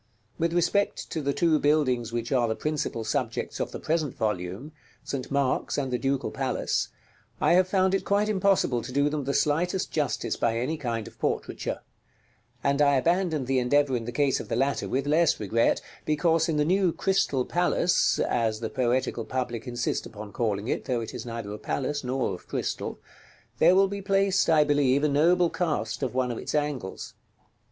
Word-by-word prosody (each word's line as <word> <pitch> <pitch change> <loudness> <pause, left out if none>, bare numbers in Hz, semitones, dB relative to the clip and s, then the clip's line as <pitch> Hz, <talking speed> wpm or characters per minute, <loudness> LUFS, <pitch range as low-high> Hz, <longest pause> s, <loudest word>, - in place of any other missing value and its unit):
With 165 0 +1
respect 175 +4 0
to 160 - -2
the 140 0 0
two 160 0 +2
buildings 130 -6 +1
which 120 +1 -3
are 125 -3 +3
the 110 - -1
principal 150 -6 -2
subjects 115 +1 -2
of - - -2
the - - -6
present 155 -4 -1
volume, 105 - -3 0.3
St. 130 -2 -4
Mark's 140 -2 0
and 135 -3 -2
the 125 - 0
Ducal 135 +1 -1
Palace, - - -1 0.5
I - - +3
have 185 +1 +4
found 190 0 +2
it 195 - +1
quite 205 +1 +1
impossible 195 - +2
to 125 - -7
do 140 +2 +2
them 150 -3 -2
the 140 - -1
slightest 175 +5 +1
justice 150 -3 -1
by 115 -1 0
any 130 +7 -1
kind 115 -6 -3
of 115 - -14
portraiture; - - -2 0.8
and 140 +1 +2
I 140 -1 +5
abandoned 165 0 +1
the 130 0 +1
endeavor 135 +2 +2
in 115 -2 -3
the 120 - -4
case 135 +2 +1
of - - -8
the - - 0
latter 135 +3 0
with 135 +1 -1
less 155 +2 +3
regret, 110 +3 +1 0.2
because 160 +2 +2
in 155 - 0
the 150 - +2
new 185 +1 +3
Crystal 165 -9 +1
Palace 175 0 +2
(as 110 -2 0
the 110 -1 -4
poetical 125 -2 0
public 120 0 -4
insist 120 0 -2
upon 105 -1 -10
calling 105 -2 -1
it, - - -2
though 125 -3 -1
it 115 - -6
is - - -6
neither 115 -3 -5
a 105 - -7
palace, 145 +2 -2
nor 130 +1 -1
of 90 - -10
crystal) - - -3 0.6
there 180 - +6
will 195 +1 +5
be 200 +1 -5
placed, 195 -1 +2
I 155 -2 +6
believe, 145 -2 +2
a - - +4
noble 170 +4 +3
cast 150 -11 -2
of 130 -2 -2
one 130 -1 +1
of 115 - -4
its - - -4
angles. 145 -10 -3
140 Hz, 195 wpm, -27 LUFS, 120-165 Hz, 0.8 s, there